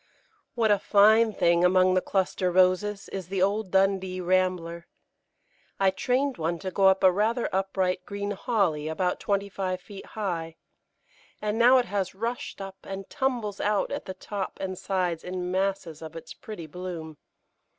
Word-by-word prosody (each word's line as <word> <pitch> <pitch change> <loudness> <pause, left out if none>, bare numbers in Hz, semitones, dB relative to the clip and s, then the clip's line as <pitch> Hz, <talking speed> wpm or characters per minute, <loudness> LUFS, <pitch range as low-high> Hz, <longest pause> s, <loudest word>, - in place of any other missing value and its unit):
What 225 -3 +3
a 205 - +4
fine 220 +3 +5
thing, 170 -3 +3
among 185 0 +5
the 185 - +3
cluster 185 -1 0
Roses, 185 +3 +2
is 190 -3 -5
the 190 0 0
old 205 +1 0
Dundee 190 -1 +1
Rambler! 180 -2 0 0.9
I 195 -1 +4
trained 255 +6 0
one 165 +2 -1
to 185 +2 -5
go 195 +1 +4
up 190 0 +4
a 185 - +7
rather 220 +5 +1
upright 190 -1 0
green 200 0 -3
Holly 195 - 0
about 180 +3 -1
twenty 200 0 0
five 185 -2 -3
feet 195 +1 -11
high, 165 -6 -3 0.8
and 210 +1 -2
now 250 +3 +7
it 250 - +2
has 195 -3 -2
rushed 230 +3 -4
up 195 0 -7
and 195 0 -7
tumbles 235 -7 -1
out 205 -1 +1
at 285 +1 -4
the 190 - -6
top 195 +1 -5
and 190 -1 -3
sides 180 -3 -2
in 180 0 -4
masses 190 -4 -1
of 160 0 -9
its 165 - -8
pretty 210 -7 -8
bloom. 165 -2 -7
190 Hz, 165 wpm, -27 LUFS, 180-205 Hz, 0.9 s, a